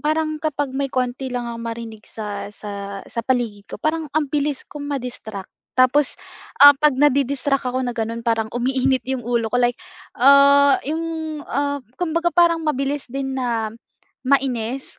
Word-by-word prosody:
parang 310 0 0
kapag 290 -3 -2
may 275 +1 -1
konti 255 +1 -1
lang 245 -1 -3
ako 230 - -6
marinig 230 -2 -7
sa 210 -2 -5
sa 200 -1 -7
sa - - -8
paligid 230 -5 -1
ko - - -5
parang 315 0 0
ang 310 -2 +2
bilis 290 -2 0
kong 290 -1 -7
ma-distract 235 -7 -5 0.3
tapos, 255 +2 +4 0.4
ah, 285 0 +11
'pag 300 -2 +3
na-di-distract 280 0 +2
ako 255 +1 -1
na 245 - -2
ganon 230 +1 -3
parang 225 -2 0
umiinit 260 +2 +1
yung 260 -2 -2
ulo 235 -1 0
ko, - - +2
like, 240 0 +2 0.4
ah, 280 +1 +7
yung, 320 0 -3
ah, 285 0 -1 0.2
kumbaga 335 0 +1
parang 340 -1 +4
mabilis 280 0 -1
din 270 0 -3
na 230 -3 -1 0.6
mainis 265 -2 0
265 Hz, 155 wpm, -21 LUFS, 235-290 Hz, 0.6 s, ah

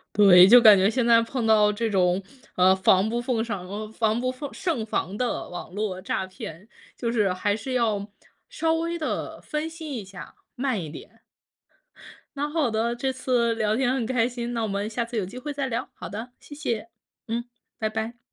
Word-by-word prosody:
对， 190 -3 +8
就 245 +2 +9
感 215 -3 +9
觉 190 +3 +3
现 245 0 0
在 230 -1 +6
碰 230 0 -3
到 210 -1 +5
这 225 +2 -1
种， 185 -2 +2 0.3
啊， 185 +1 +5
防不胜防 215 0 0
防 220 +1 0
不 255 0 -1 0.2
胜 295 -12 -2
防 205 -2 -2
的 250 0 -2
网 175 0 -8
络 200 -2 -3
诈 190 - -2
骗， 185 +1 -9 0.3
就 235 -1 -2
是， 205 -5 +2
还 205 +3 0
是 240 +5 -6
要 215 -4 0 0.4
稍 330 -10 0
微 335 +1 -2
地 310 - -4
分 305 +1 -3
析 320 -1 -8
一 210 - -5
下， 190 -1 -11 0.2
慢 250 -7 -1
一 155 - -6
点。 - - -12 1.2
那 290 +1 -1
好 295 -6 0
的， 225 +2 0
这 265 +2 -2
次 245 -3 +1
聊 215 -1 0
天 260 -1 +1
很 250 -4 -1
开 240 -2 +1
心， 240 -1 -5
那 230 -1 -2
我 220 - -1
们 200 +2 -2
下 235 +2 -2
次 235 0 -7
有 205 - 0
机 245 +7 -9
会 295 +3 -5
再 280 -1 -2
聊。 235 +1 -3
好 - - -8
的， 230 +4 -7
谢 290 - -11
谢， 235 -7 -3 0.4
嗯， 235 +1 -2 0.3
拜 220 - 0
拜。 225 +2 -4
230 Hz, 215 characters per minute, -25 LUFS, 205-250 Hz, 1.2 s, 就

